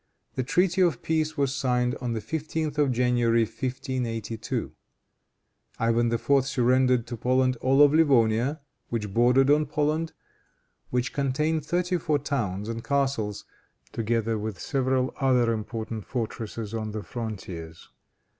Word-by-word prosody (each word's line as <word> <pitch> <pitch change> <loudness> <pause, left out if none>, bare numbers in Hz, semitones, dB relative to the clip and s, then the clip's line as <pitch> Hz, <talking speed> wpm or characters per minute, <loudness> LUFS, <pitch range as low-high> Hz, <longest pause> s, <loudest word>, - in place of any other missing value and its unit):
The 130 - -1
treaty 180 +8 +2
of 170 -9 +2
peace 160 -1 0
was 140 -2 +1
signed 125 -2 +1
on 120 -2 -2
the 110 - -3
15th 155 +4 -3
of 145 -3 +3
January, 120 -2 +2
1582. 120 -3 -3 1.1
Ivan 115 0 +2
IV. 135 +4 +2
surrendered 125 -2 +2
to 120 0 -5
Poland 130 +2 +2
all 135 +4 +4
of 145 0 +5
Livonia 135 -2 +3 0.3
which 105 -4 -3
bordered 125 +4 +4
on 150 0 +3
Poland, 155 +2 -1 0.8
which 125 +1 -1
contained 150 +3 0
thirty 180 +3 0
four 155 -2 +1
towns 110 -9 -2
and 115 0 -4
castles, 135 -7 -1 0.5
together 115 -1 -1
with 105 -4 -5
several 130 0 0
other 125 -4 +3
important 110 0 -5
fortresses 115 -2 -4
on 110 -2 -3
the 110 -1 -4
frontiers. 95 -6 -7
125 Hz, 130 wpm, -26 LUFS, 115-140 Hz, 1.1 s, of